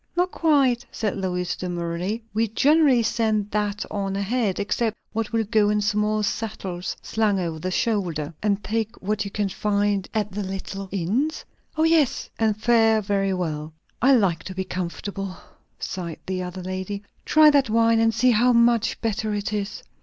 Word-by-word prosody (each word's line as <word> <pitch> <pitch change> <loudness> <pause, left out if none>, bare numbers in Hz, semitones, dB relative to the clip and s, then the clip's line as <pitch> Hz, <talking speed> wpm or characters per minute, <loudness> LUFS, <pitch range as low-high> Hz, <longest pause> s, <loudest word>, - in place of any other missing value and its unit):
"Not 360 +1 +2
quite," 275 -6 +3
said 215 -3 -2
Lois 180 -2 -2
demurely. 175 +4 -3
"We 225 +2 +1
generally 275 +2 +4
send 220 -2 0
that 210 -1 -1
on 195 -1 -2
ahead, 200 0 0
except 220 +2 -1 0.2
what 225 -1 -2
will 225 -1 +1
go 210 0 +2
in 210 0 +2
small 210 +1 +1
satchels 195 -4 -3
slung 215 -3 +1
over 165 -3 -3
the 185 - -3
shoulder." 175 -7 -1
"And 205 -1 0
take 225 +1 -2
what 205 +1 -1
you - - -4
can 205 0 -1
find 205 0 0
at 210 -2 -1
the 205 +2 -3
little 195 0 -5
inns?" 220 - -1 0.3
"O 315 - +3
yes; 320 -5 +2
and 220 -2 +2
fare 225 -1 +4
very 195 -2 0
well." 155 -3 -3 0.3
"I 270 +3 +6
like 185 -8 +1
to 185 - -6
be 190 - -1
comfortable!" 185 +1 -5 0.4
sighed 170 -3 -5
the 185 -1 -2
other 180 0 -6
lady. 190 +2 -4 0.2
"Try 310 -1 +6
that 280 -5 +3
wine, 230 +1 +4
and 225 0 +4
see 250 +3 +3
how 240 +2 +4
much 235 -1 +3
better 215 -1 -1
it 205 +1 -3
is." 205 0 -3
210 Hz, 170 wpm, -24 LUFS, 190-225 Hz, 0.4 s, I